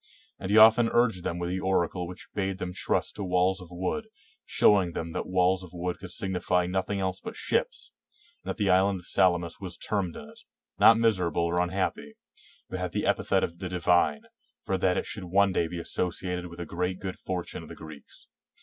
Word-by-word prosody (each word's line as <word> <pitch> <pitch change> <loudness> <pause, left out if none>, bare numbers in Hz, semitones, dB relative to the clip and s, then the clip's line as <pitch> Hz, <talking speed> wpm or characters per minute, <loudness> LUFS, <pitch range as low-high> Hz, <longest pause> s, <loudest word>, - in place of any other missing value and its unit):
And 95 - -5
he 105 - +4
often 115 +1 +7
urged 115 -7 +2
them 85 - -2
with 90 0 -3
the 95 - -1
oracle 90 -1 0
which 90 - -10
bade 95 -2 -2
them 90 -2 -5
trust - - -1
to 105 - -3
walls 90 +1 +1
of 90 - -10
wood, 95 - -3 0.4
showing 95 -5 +4
them 80 +1 -4
that - - -4
walls 95 0 +2
of 90 -2 -11
wood 90 +1 -3
could 90 - -8
signify 90 -1 0
nothing 95 +2 -1
else 95 -1 -2
but - - -8
ships; - - -2 0.5
and - - -7
that - - -3
the 100 -4 +2
island 95 0 +3
of - - -13
Salamis 85 -3 +2
was 90 -3 -4
termed 95 -5 -2
in 75 - -9
it, - - -15 0.4
not 115 - +8
miserable 95 -7 +2
or 85 +1 +1
un 90 - 0
happy, 90 -6 -3 0.5
but 95 - -5
had 90 -1 -3
the - - -1
epithet - - +1
of 85 +1 -4
divine, 90 -4 +1 0.4
for 95 - 0
that 90 -1 +1
it - - -1
should 105 -4 -6
one 100 +2 +3
day 85 - +1
be 85 - -6
associated 90 +1 -2
with 85 0 -12
a 85 - -4
great 90 +3 -3
good 95 -1 -6
fortune 90 -2 -4
of - - -12
the - - -9
Greeks. 80 -4 -12
90 Hz, 210 wpm, -28 LUFS, 90-95 Hz, 0.5 s, not